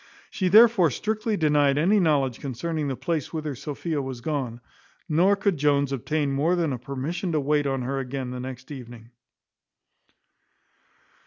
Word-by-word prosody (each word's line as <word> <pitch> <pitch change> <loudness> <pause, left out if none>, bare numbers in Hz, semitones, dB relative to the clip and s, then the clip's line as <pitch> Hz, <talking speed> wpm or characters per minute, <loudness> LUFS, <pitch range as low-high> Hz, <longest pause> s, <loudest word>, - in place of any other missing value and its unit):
She 185 - -1
therefore 215 -3 +6
strictly 215 - -2
denied 145 -3 +3
any 190 +8 +3
knowledge 140 -8 +1
concerning 150 +3 -3
the 135 - -2
place 165 0 -3
whither 155 -3 -3
Sophia 150 +3 -4
was 130 -2 -6
gone; 125 -4 -3 0.5
nor 180 +5 +3
could 195 -3 0
Jones 140 -1 +2
obtain 145 +2 -1
more 150 +6 +1
than 165 -5 0
a 125 - -4
permission 140 - -4
to 155 - +2
wait 145 0 +1
on 135 -2 -1
her 135 +2 -2
again 130 -1 -4
the 125 - -5
next 130 +1 -8
evening. 120 -4 -10
145 Hz, 155 wpm, -25 LUFS, 130-170 Hz, 0.5 s, therefore